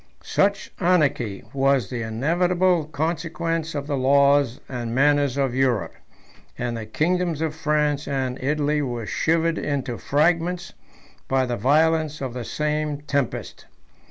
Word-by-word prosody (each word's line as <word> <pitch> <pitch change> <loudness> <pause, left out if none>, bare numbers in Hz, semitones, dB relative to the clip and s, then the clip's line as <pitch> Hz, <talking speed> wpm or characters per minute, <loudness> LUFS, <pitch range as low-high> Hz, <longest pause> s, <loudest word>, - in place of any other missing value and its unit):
Such 200 0 0
anarchy 145 - +1
was 135 -5 +2
the 120 -2 -3
inevitable 170 +9 +1
consequence 165 +1 -2
of 140 -1 -3
the 145 -1 -2
laws 140 -1 +3
and 120 -2 -4
manners 145 -1 +3
of 135 -3 +1
Europe; 130 -5 +1 0.6
and 120 -1 -2
the 110 -1 -6
kingdoms 170 +5 0
of 160 -1 -1
France 150 -2 0
and 130 -2 -2
Italy 150 +1 +1
were 120 -5 -3
shivered 165 +6 +1
into 135 -5 -3
fragments 170 +4 +1 0.5
by 130 -1 +2
the 120 -1 -2
violence 155 +5 +2
of 130 -3 -4
the 125 -1 -5
same 150 0 -2
tempest. 140 -4 -3
145 Hz, 130 wpm, -23 LUFS, 130-160 Hz, 0.6 s, laws